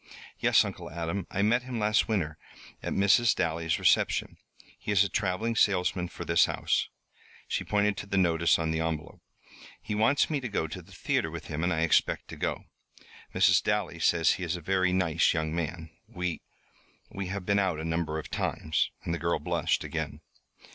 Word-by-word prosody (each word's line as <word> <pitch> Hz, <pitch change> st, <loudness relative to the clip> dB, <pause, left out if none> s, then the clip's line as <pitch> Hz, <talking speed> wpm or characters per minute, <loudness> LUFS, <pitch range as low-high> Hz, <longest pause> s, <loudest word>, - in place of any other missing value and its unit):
"Yes, -, -, +4 dB
Uncle -, -, -7 dB
Adam. 85 Hz, +3 st, -4 dB
I 100 Hz, -, -1 dB
met 120 Hz, +4 st, +3 dB
him 125 Hz, -1 st, -6 dB
last 105 Hz, 0 st, +2 dB
winter, 85 Hz, -9 st, -1 dB, 0.4 s
at -, -, -4 dB
Mrs. 100 Hz, +3 st, +4 dB
Dally's 80 Hz, 0 st, 0 dB
reception. -, -, +2 dB, 0.4 s
He -, -, -4 dB
is 100 Hz, -1 st, +5 dB
a 100 Hz, -, -2 dB
traveling 105 Hz, +4 st, -1 dB
salesman 90 Hz, -3 st, +2 dB
for -, -, -8 dB
this 85 Hz, 0 st, +4 dB
house," -, -, -1 dB, 0.6 s
she -, -, -2 dB
pointed 105 Hz, -1 st, +1 dB
to 100 Hz, -, -6 dB
the 100 Hz, -, -1 dB
notice 85 Hz, -2 st, +3 dB
on 80 Hz, -1 st, -1 dB
the 80 Hz, -, -1 dB
envelope. 80 Hz, -1 st, -4 dB, 0.6 s
"He -, -, -5 dB
wants 110 Hz, +7 st, +3 dB
me 150 Hz, -3 st, -1 dB
to 130 Hz, -3 st, -5 dB
go 100 Hz, -, -1 dB
to 80 Hz, +4 st, -7 dB
the 90 Hz, +3 st, -19 dB
theatre 90 Hz, -3 st, -1 dB
with 80 Hz, -1 st, -8 dB
him, 80 Hz, +1 st, -3 dB
and 90 Hz, -, +1 dB
I 80 Hz, -2 st, 0 dB
expect 85 Hz, -, +2 dB
to -, -, -7 dB
go. -, -, -3 dB, 0.7 s
Mrs. -, -, +5 dB
Dally 105 Hz, -5 st, -1 dB
says 85 Hz, 0 st, +3 dB
he 95 Hz, -, -5 dB
is 85 Hz, +1 st, -1 dB
a -, -, -5 dB
very 95 Hz, +2 st, +1 dB
nice 90 Hz, -4 st, +2 dB
young 80 Hz, 0 st, -1 dB
man. 80 Hz, -1 st, -4 dB, 0.2 s
We 90 Hz, -6 st, -4 dB, 0.7 s
we 95 Hz, -1 st, -4 dB
have 95 Hz, 0 st, -4 dB
been 100 Hz, +1 st, +2 dB
out 95 Hz, -5 st, 0 dB
a 80 Hz, -, -4 dB
number 80 Hz, -1 st, -1 dB
of 80 Hz, -, -7 dB
times." 80 Hz, -, -1 dB
And 85 Hz, -, -2 dB
the 85 Hz, -, -2 dB
girl 85 Hz, 0 st, 0 dB
blushed -, -, 0 dB
again. -, -, -4 dB
90 Hz, 195 wpm, -28 LUFS, 80-100 Hz, 0.7 s, is